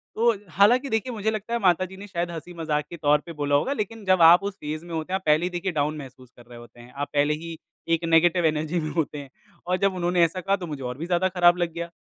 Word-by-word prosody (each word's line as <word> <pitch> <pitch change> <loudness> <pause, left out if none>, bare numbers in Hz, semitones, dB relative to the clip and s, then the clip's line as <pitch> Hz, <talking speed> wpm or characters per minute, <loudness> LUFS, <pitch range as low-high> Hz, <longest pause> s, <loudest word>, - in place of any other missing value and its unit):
तो 235 +2 +3 0.2
हालाँकि 245 - +4
देखिए 225 +3 -1
मुझे 220 0 -1
लगता 215 +2 -5
है 235 - +1
माताजी 185 0 +1
ने 205 +1 -10
शायद 170 -2 -3
हँसी-मज़ाक 160 -2 -4
के 170 - -8
तौर 150 -1 +3
पे 170 - -8
बोला 145 -2 0
होगा, 260 - +1
लेकिन 220 -2 -5
जब 185 -2 +3
आप 170 +4 +8
उस 200 -1 -4
फेज़ 155 +3 -6
में 170 - -9
होते 160 +2 -4
हैं - - +3
आप 190 - -28
पहले 155 +3 +3
ही - - -1
देखिए 180 +1 -3
डाउन 150 0 -1
महसूस 130 -3 -11
कर 120 - -16
रहे 120 0 -13
होते 120 0 -15
हैं। 120 +1 -14
आप 145 +1 -4
पहले 145 +1 +2
ही 165 0 -6 0.4
एक 165 - -7
नेगेटिव 165 +1 +3
एनर्जी 155 +2 0
में 155 - -3
होते 155 -3 -2
हैं 140 -2 -9 0.4
और 180 0 +1
जब 195 0 +1
उन्होंने 175 -1 +2
ऐसा 175 +3 0
कहा, 195 +2 +1
तो 180 -3 -7
मुझे 145 -3 -6
और 125 0 -5
भी 160 - -5
ज़्यादा 180 +1 +1
ख़राब 175 -1 +4
लग 175 -2 -1
गया। 170 0 -4
170 Hz, 275 wpm, -24 LUFS, 150-185 Hz, 0.4 s, आप